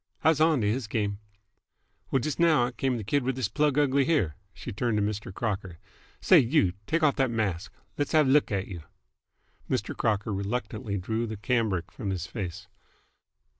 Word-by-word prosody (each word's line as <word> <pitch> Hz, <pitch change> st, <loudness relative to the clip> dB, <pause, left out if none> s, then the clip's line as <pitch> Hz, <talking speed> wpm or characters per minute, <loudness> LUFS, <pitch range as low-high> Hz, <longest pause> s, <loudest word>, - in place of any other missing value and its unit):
I 160 Hz, -, +6 dB
was 155 Hz, -1 st, +2 dB
onto 155 Hz, -8 st, +3 dB
h's 110 Hz, +3 st, 0 dB
game! 105 Hz, -2 st, -2 dB, 0.9 s
Well, 135 Hz, -, +2 dB
just 150 Hz, +5 st, -3 dB
now 160 Hz, -7 st, +4 dB
out 125 Hz, 0 st, -6 dB
came 130 Hz, -2 st, 0 dB
the 110 Hz, -, -5 dB
kid 140 Hz, +8 st, +1 dB
with 130 Hz, 0 st, -1 dB
this 130 Hz, -6 st, -1 dB
plug 150 Hz, -2 st, +1 dB
ugly 140 Hz, -1 st, +3 dB
here." 125 Hz, -, +1 dB, 0.2 s
She -, -, -8 dB
turned 115 Hz, +1 st, -1 dB
to 105 Hz, -, +2 dB
Mr. 105 Hz, -1 st, -3 dB
Crocker. 95 Hz, -4 st, -3 dB, 0.4 s
"Say -, -, +6 dB
you! 120 Hz, -, +2 dB
Take 165 Hz, 0 st, 0 dB
off 145 Hz, -2 st, +3 dB
th't 135 Hz, -2 st, +2 dB
mask. 100 Hz, -5 st, -2 dB, 0.3 s
Let's 145 Hz, -, -1 dB
have 155 Hz, -3 st, +5 dB
a -, -, +3 dB
l'k 145 Hz, -3 st, +4 dB
at 100 Hz, -2 st, -1 dB
you!" 90 Hz, -4 st, -7 dB, 0.9 s
Mr. -, -, -1 dB
Crocker 105 Hz, -1 st, 0 dB
reluctantly 105 Hz, 0 st, -3 dB
drew 110 Hz, +5 st, -2 dB
the 110 Hz, -1 st, -5 dB
cambric 105 Hz, -5 st, 0 dB
from 105 Hz, -5 st, -5 dB
his 90 Hz, -3 st, -2 dB
face. 100 Hz, -1 st, -6 dB
115 Hz, 190 wpm, -27 LUFS, 100-135 Hz, 0.9 s, I